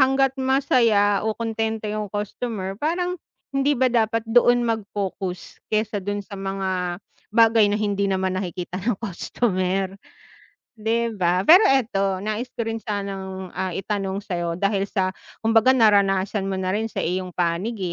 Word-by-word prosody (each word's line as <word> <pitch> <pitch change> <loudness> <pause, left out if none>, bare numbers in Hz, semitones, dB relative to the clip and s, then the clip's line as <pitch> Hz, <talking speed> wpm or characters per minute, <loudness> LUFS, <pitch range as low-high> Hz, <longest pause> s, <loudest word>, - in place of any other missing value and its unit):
Hangga't 270 0 +4
masaya 235 -7 +3
o 220 - -2
kontento 225 -1 -2
yung 210 -1 -3
customer, 205 -1 -4
parang 355 +3 -1 0.3
hindi 275 +1 +2
ba 260 +1 +3
dapat 225 -1 +1
doon 240 +1 +4
mag-focus, 200 -5 -4
kaysa 215 -1 0
do'n 205 +1 -3
sa 200 - -10
mga 190 -2 -2 0.4
bagay 225 -2 +6
na 205 - +1
hindi 200 -2 0
naman 190 -1 0
nakikita 180 -1 -4
ng 210 +1 0
customer 190 -2 -1 0.8
'di 230 +1 -1
ba? 180 -2 +2
Pero 360 +6 +9
eto, 195 -7 +1
nais 215 +5 -3
ko 230 - -4
rin 225 0 -4
sanang, 195 -2 -4
ah 185 0 -2
itanong 195 +1 -2
sa'yo, 175 -3 -3
dahil 200 -1 +1
sa 190 -2 -1 0.2
kumbaga 225 +3 +4
naranasan 200 -4 +3
mo 190 - -2
na 185 +1 -1
rin 220 +1 -2
sa - - -4
iyong 185 +1 -2
panig, 180 +6 -1
205 Hz, 145 wpm, -23 LUFS, 190-230 Hz, 0.8 s, Pero